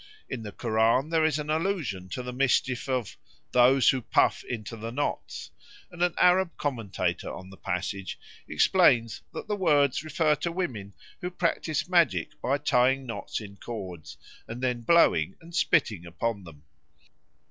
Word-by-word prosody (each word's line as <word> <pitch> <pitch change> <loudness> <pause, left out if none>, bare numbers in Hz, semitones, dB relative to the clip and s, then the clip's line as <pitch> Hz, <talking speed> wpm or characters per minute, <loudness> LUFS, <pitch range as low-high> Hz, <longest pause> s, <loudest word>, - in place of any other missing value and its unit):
In 125 - -5
the 105 -2 -7
Koran 115 +6 +1
there 165 -1 +2
is 155 -2 +2
an 150 0 -3
allusion 155 - -2
to 125 - -4
the 125 0 -6
mischief 130 0 +1
of 125 -6 -2 0.3
"those 125 +2 +5
who 130 - -2
puff - - +2
into 115 -1 -6
the 115 +1 -6
knots," 145 +4 -4 0.4
and 175 -1 -9
an 175 -1 +2
Arab 180 -1 +3
commentator 115 -9 -2
on 95 0 -9
the 95 - -13
passage 95 +1 -4 0.3
explains 115 -2 +3
that - - -7
the 210 - -1
words 145 -8 +2
refer 155 -1 +2
to 170 - -2
women 120 - -4 0.3
who 180 - -2
practise 170 -4 -1
magic 175 -3 +2
by 135 +3 +1
tying 135 -1 +2
knots 115 - -5
in 100 -2 -10
cords, 90 - -8 0.3
and 120 +3 -7
then 125 -2 0
blowing 170 +8 +4
and 170 +1 -15
spitting 110 - +1
upon 100 +3 -3
them. 75 -3 -14
125 Hz, 160 wpm, -27 LUFS, 110-155 Hz, 0.4 s, those